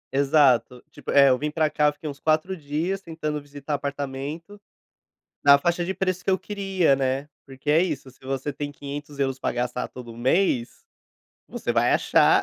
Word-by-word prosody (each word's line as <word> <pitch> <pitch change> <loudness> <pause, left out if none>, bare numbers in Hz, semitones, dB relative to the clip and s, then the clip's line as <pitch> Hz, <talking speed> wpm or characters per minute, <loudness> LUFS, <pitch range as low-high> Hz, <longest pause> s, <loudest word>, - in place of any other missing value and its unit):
Exato, 135 -4 +3
tipo, - - -11
é, 140 -1 +7
eu 130 -1 +3
vim 150 - -1
para 155 0 0
cá, 150 -1 +3
fiquei 150 +1 -9
uns 140 -1 -6
4 155 +4 +1
dias 165 +5 -2
tentando 155 -4 -4
visitar 145 +1 -7
apartamento 145 +7 -5 0.8
na 140 0 +9
faixa 175 +4 0
de 190 +2 -2
preço 185 -1 -2
que - - +1
eu - - +4
queria, 195 -7 +1
né, 135 +1 -1 0.2
porque 135 +2 -4
é 155 +2 +5
isso, 150 -7 -2
se 125 - -24
você 135 +2 -3
tem 145 +1 -5
500 145 0 -7
euros 135 -1 0
para - - -2
gastar 125 +1 -2
todo 120 -2 -10
mês, 130 0 +1 0.6
você - - -4
vai - - +3
achar, - - +4
145 Hz, 180 wpm, -24 LUFS, 135-160 Hz, 0.8 s, na